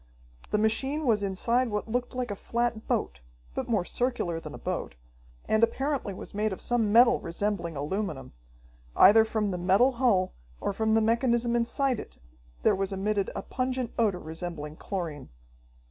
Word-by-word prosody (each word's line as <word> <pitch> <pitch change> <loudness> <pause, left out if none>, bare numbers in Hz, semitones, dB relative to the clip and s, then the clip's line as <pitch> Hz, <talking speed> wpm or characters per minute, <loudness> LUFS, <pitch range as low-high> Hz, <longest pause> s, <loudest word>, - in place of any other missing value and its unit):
The - - +1
machine 265 +8 0
was 220 -4 +3
inside 230 +6 +1
what 210 0 -2
looked 245 +2 -2
like 250 -3 -2
a - - -3
flat 235 +1 -2
boat, - - -1 0.3
but - - -4
more 205 -6 +1
circular 240 -10 -1
than - - -8
a - - -8
boat, - - -4 0.5
and 220 +1 +2
apparently 270 -1 0
was 185 - -9
made 210 +1 0
of 190 - -5
some 230 -4 +1
metal 240 +2 +6
resembling 170 -1 -2
aluminum. 150 -2 -3 0.6
Either 220 +2 +8
from 220 -2 -1
the 180 - -3
metal 195 +9 +4
hull 235 -8 +2 0.3
or - - -2
from 220 +2 +1
the 225 - +4
mechanism 235 +1 +2
inside 240 +1 +1
it - - -10 0.5
there - - +5
was 195 0 -2
emitted 200 +1 0
a - - -4
pungent 255 -1 -2
odor 210 -5 +2
resembling 160 -2 -6
chlorine. 165 -7 -5
215 Hz, 165 wpm, -28 LUFS, 190-240 Hz, 0.6 s, Either